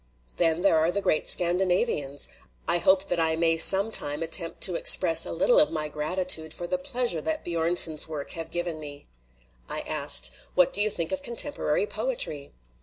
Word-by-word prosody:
"Then 165 0 0
there 180 -4 +1
are 160 +2 -1
the 200 - -3
great 155 -5 -2
Scandinavians. 175 - -1 0.4
I 170 0 +2
hope 190 +2 +1
that 175 - -2
I 160 -1 +1
may 165 0 0
some 195 +6 +7
time 150 -5 0
attempt 165 +1 +2
to - - +5
express - - +5
a - - -7
little - - +1
of 300 - +2
my 155 -2 -5
gratitude 160 +1 -3
for 175 - -7
the 270 +10 -4
pleasure 250 - -2
that 160 +1 -5
B 175 - -7
join 165 +1 -2
son's 155 -3 +3
works 150 -3 -7
have 165 -1 -7
given 175 -2 -5
me." 145 -2 -12 0.6
I - - -4
asked, - - -1 0.2
"What 180 -1 +1
do 205 - 0
you 215 - +2
think 170 -5 -5
of 285 - -5
contemporary 290 - -1
poetry?" 425 - -5
170 Hz, 190 wpm, -24 LUFS, 160-200 Hz, 0.6 s, some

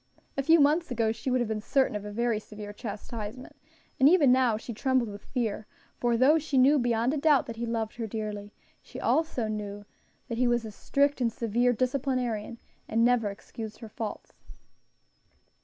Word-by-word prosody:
A 275 - 0
few 325 +4 +5
months 300 +4 +3
ago 230 -3 +1
she 225 +4 -4
would 255 -1 +2
have 240 - 0
been 215 -1 -3
certain 265 0 +1
of 205 - -4
a 210 - -6
very 235 0 0
severe 210 -1 -9
chastisement, 215 +2 -7 0.4
and 270 +2 +7
even 310 -7 +5
now 250 -4 +3
she 235 +2 -7
trembled 255 0 +1
with 205 0 -9
fear; 220 -4 -3 0.3
for 240 -1 +1
though 285 +6 +5
she 290 -3 -2
knew 275 +3 +6
beyond 240 +1 +1
a - - -1
doubt 295 -2 +4
that 230 -2 -7
he 235 +1 -3
loved 225 -1 -3
her 230 -2 -3
dearly, 210 -1 -5 0.3
she - - -12
knew - - -5
also 215 -9 -1 0.4
that 230 -2 -4
he 250 - +3
was 240 -1 +1
a 220 - -6
strict 280 +6 0
and 235 -2 +2
severe 235 +2 +1
disciplinarian, 250 -3 -1 0.3
and 230 +1 +2
never 240 -4 +3
excused 215 +2 -8
her 225 - -10
faults. 215 0 -6
235 Hz, 190 wpm, -28 LUFS, 215-260 Hz, 0.4 s, and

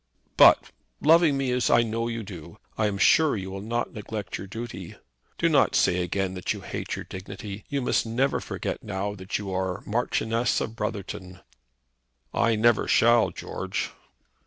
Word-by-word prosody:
"But, - - +6 0.3
loving 160 -2 +5
me 135 -2 0
as 125 0 +1
I 120 - +5
know 115 +1 -2
you 115 -1 -4
do, 90 -6 -10 0.2
I 110 - +1
am 100 -1 -2
sure 150 +6 +4
you 95 -1 -5
will 95 0 -6
not 115 +3 -2
neglect 105 -2 -5
your 95 - -7
duty. 115 +4 -7 0.4
Do - - +2
not - - +3
say 90 0 +3
again 95 +2 -1
that 90 -1 -2
you - - -8
hate - - -4
your - - -7
dignity. 100 +2 -8
You 140 -2 -1
must - - +2
never 125 +5 0
forget - - -4
now 100 0 -3
that 95 -1 -4
you 100 -2 -5
are 95 0 -2
Marchioness 115 +1 0
of 110 - -4
Brotherton." 95 -5 -5 0.9
"I 115 -1 +2
never 115 +1 +3
shall, 120 0 +4
George." - - -4
110 Hz, 170 wpm, -26 LUFS, 95-120 Hz, 0.9 s, But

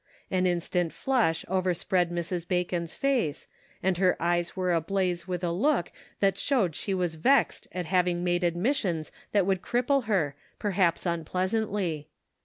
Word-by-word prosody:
An 185 0 +2
instant 175 -1 0
flush 230 -12 +1
overspread 180 -1 +1
Mrs. 175 0 -3
Bacon's 175 -2 -1
face, 255 - 0 0.4
and 185 -1 +2
her 185 -1 +3
eyes 175 0 0
were 185 -2 +1
ablaze 175 +1 0
with 180 -1 -3
a 170 - +1
look 205 - +1 0.3
that 195 -1 +2
showed 230 - +1
she 160 +6 -3
was 180 -3 0
vexed 260 - +2
at 180 -1 -3
having 175 0 +1
made 175 0 +1
admissions 175 - 0 0.2
that 200 -3 +3
would 190 -1 +1
cripple 250 +3 +1
her, 180 -10 +1 0.2
perhaps 190 -5 +1
unpleasantly. 185 -1 -1
180 Hz, 145 wpm, -28 LUFS, 170-195 Hz, 0.4 s, her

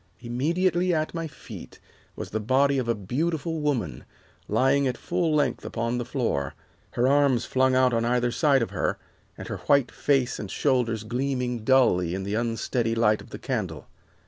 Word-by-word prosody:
Immediately 170 +9 0
at 155 0 -1
my 165 -1 -3
feet 150 - -11 0.4
was - - -7
the 110 - -1
body 135 +5 +2
of 125 - -2
a 115 - +1
beautiful 155 - -2
woman, 130 - -1 0.4
lying 135 +1 +2
at 125 -1 -2
full 170 -3 0
length 140 -5 +1
upon 115 +1 -2
the 120 - -3
floor, 115 - -2 0.4
her 120 +1 +2
arms 140 -3 +3
flung 130 0 +2
out 130 -1 +4
on 115 0 +1
either 120 0 +1
side 140 -1 +3
of - - -5
her, - - -1 0.4
and - - -8
her - - -4
white 140 -3 +4
face 135 -3 +1
and 105 - -6
shoulders 120 -5 0
gleaming 125 +1 -2
dully 110 -8 +3
in 95 - -4
the 100 +1 -3
unsteady 115 +1 -1
light 110 -2 +2
of - - -14
the - - -7
candle. - - -4
125 Hz, 175 wpm, -26 LUFS, 115-140 Hz, 0.4 s, out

